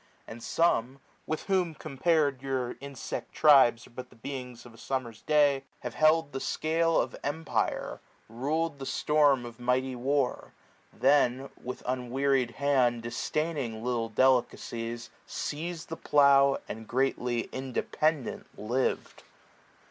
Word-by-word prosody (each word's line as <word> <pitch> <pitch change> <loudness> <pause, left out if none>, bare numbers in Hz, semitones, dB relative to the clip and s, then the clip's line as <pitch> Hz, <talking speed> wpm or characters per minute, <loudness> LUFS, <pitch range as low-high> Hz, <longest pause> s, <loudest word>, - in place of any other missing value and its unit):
And 115 +1 -9
some, 135 -4 +1 0.3
with 155 - -2
whom 180 -5 0
compar'd 145 -2 0
yom* 130 -2 -2
insect 140 -1 -6
tribes 135 -6 +6
60 - - -14
Are - - -21
but 125 0 -7
the - - -19
beings 125 -1 -7
of 120 - -13
a - - -16
summer^s 120 -3 -4
day, 145 -3 +3 0.2
Have - - -5
held 155 -1 +3
the 135 - -4
scale 165 +3 +1
of - - -2
empire, 150 +2 -2 0.3
rul'd 145 +6 -2
the 135 - -6
storm 145 -4 +3
Of 120 0 -10
mighty 125 +1 0
war; 135 +1 -1 0.4
then, 135 -1 +2
with 125 0 -6
unwearied 130 +1 0
hand. 130 -5 +2
Disdaining 120 -1 -2
little 120 -2 -1
delicacies, 120 -1 0 0.2
seiz'd 165 +2 -5
The 165 - -5
plough, 140 -1 +5
and 110 0 -7
greatly 125 -2 0
independent 135 +2 -2
liv'd. 120 +5 -2
135 Hz, 130 wpm, -29 LUFS, 120-145 Hz, 0.4 s, tribes